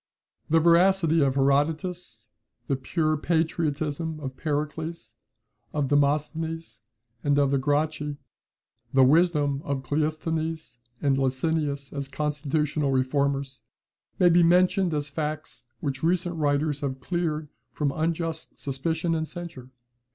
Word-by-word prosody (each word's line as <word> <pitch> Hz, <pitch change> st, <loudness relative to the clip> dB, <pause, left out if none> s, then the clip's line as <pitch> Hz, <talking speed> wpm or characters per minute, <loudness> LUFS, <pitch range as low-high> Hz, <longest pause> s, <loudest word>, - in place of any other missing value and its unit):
The 165 Hz, +1 st, +5 dB
veracity 170 Hz, 0 st, +4 dB
of 135 Hz, -2 st, +2 dB
Herodotus, 145 Hz, -1 st, 0 dB, 0.4 s
the 135 Hz, -, 0 dB
pure 155 Hz, +4 st, 0 dB
patriotism 160 Hz, -1 st, -1 dB
of 135 Hz, -3 st, -6 dB
Pericles, 155 Hz, +3 st, -3 dB, 0.6 s
of 145 Hz, -3 st, 0 dB
Demosthenes, 150 Hz, -2 st, 0 dB, 0.4 s
and 145 Hz, -1 st, +2 dB
of 140 Hz, -1 st, +3 dB
the 140 Hz, -, +2 dB
Gracchi, 145 Hz, +1 st, 0 dB, 0.7 s
the 135 Hz, -1 st, +5 dB
wisdom 145 Hz, -1 st, +3 dB
of 140 Hz, -5 st, -3 dB
Cleisthenes 155 Hz, -2 st, -2 dB, 0.2 s
and 140 Hz, -2 st, +3 dB
of 135 Hz, -, +1 dB
Licinius 140 Hz, +1 st, -1 dB
as 140 Hz, -1 st, -4 dB
constitutional 150 Hz, 0 st, -1 dB
reformers, 135 Hz, 0 st, 0 dB, 0.6 s
may 180 Hz, -, +5 dB
be 175 Hz, +1 st, +5 dB
mentioned 180 Hz, +1 st, +4 dB
as 145 Hz, 0 st, -1 dB
facts 150 Hz, -3 st, -5 dB
which 135 Hz, -2 st, -3 dB
recent 175 Hz, +1 st, +1 dB
writers 145 Hz, -1 st, +1 dB
have 135 Hz, -2 st, -3 dB
cleared 160 Hz, -1 st, -2 dB, 0.2 s
from 145 Hz, -2 st, -1 dB
unjust 165 Hz, 0 st, -2 dB
suspicion 160 Hz, +5 st, -1 dB
and 160 Hz, -1 st, -1 dB
censure. 170 Hz, -8 st, -8 dB
150 Hz, 120 wpm, -26 LUFS, 140-165 Hz, 0.7 s, The